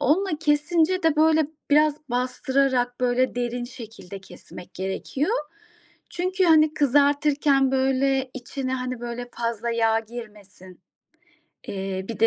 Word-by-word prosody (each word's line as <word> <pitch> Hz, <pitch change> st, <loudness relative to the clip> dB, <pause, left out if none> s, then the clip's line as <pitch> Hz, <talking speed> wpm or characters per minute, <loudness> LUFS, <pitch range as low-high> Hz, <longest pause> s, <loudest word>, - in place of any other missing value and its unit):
onunla 375 Hz, +8 st, +2 dB
kesince 325 Hz, +4 st, +2 dB
de, 320 Hz, -2 st, +3 dB
böyle, 315 Hz, -1 st, +4 dB, 0.2 s
biraz 300 Hz, 0 st, +4 dB
bastırarak, 250 Hz, 0 st, 0 dB
böyle, 250 Hz, +1 st, +1 dB
derin 245 Hz, 0 st, -2 dB
şekilde 225 Hz, -6 st, -10 dB
kesmek 180 Hz, -1 st, -13 dB
gerekiyor. 195 Hz, -, -3 dB, 0.8 s
Çünkü 370 Hz, +2 st, -1 dB
hani 310 Hz, -2 st, +5 dB
kızartırken, 285 Hz, -1 st, +3 dB
böyle, 265 Hz, 0 st, +1 dB
içine 260 Hz, 0 st, -5 dB
hani 255 Hz, -1 st, -4 dB
böyle 240 Hz, 0 st, -6 dB
fazla 235 Hz, 0 st, -2 dB
yağ 225 Hz, -1 st, +2 dB
girmesin. 210 Hz, -5 st, -12 dB, 0.9 s
Eee, 190 Hz, -1 st, -4 dB
bir 230 Hz, -, -5 dB
de 225 Hz, -, +6 dB
255 Hz, 115 wpm, -24 LUFS, 235-295 Hz, 0.9 s, de